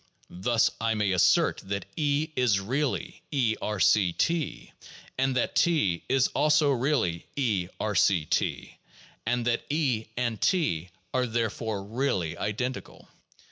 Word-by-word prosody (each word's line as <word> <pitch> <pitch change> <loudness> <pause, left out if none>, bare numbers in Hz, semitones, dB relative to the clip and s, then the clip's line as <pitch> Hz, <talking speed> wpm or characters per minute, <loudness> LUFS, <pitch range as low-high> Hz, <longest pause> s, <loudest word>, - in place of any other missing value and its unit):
Thus 115 +1 +3
I 115 0 +1
may 105 -2 +1
assert 90 -2 +3
that 100 +1 -4
E 150 0 0
is 120 -6 +3
really 130 +8 -2
(E)R 110 -6 0
C 95 -3 +4
(T), 165 - -2 0.5
and 135 0 +1
that 125 - 0
T 125 - +2
is 135 -1 +3
also 150 -1 +3
really 125 - 0
(E)B 105 -10 0 0.3
C 85 -6 +3
(T), - - -2 0.5
and 120 0 0
that 120 -1 0
E 135 -8 0
and 120 -3 -1
T 120 - +1 0.2
are 125 -1 +1
therefore 110 -2 -2
really 100 - -1
identical. 125 +7 -4
120 Hz, 130 wpm, -27 LUFS, 100-140 Hz, 0.5 s, C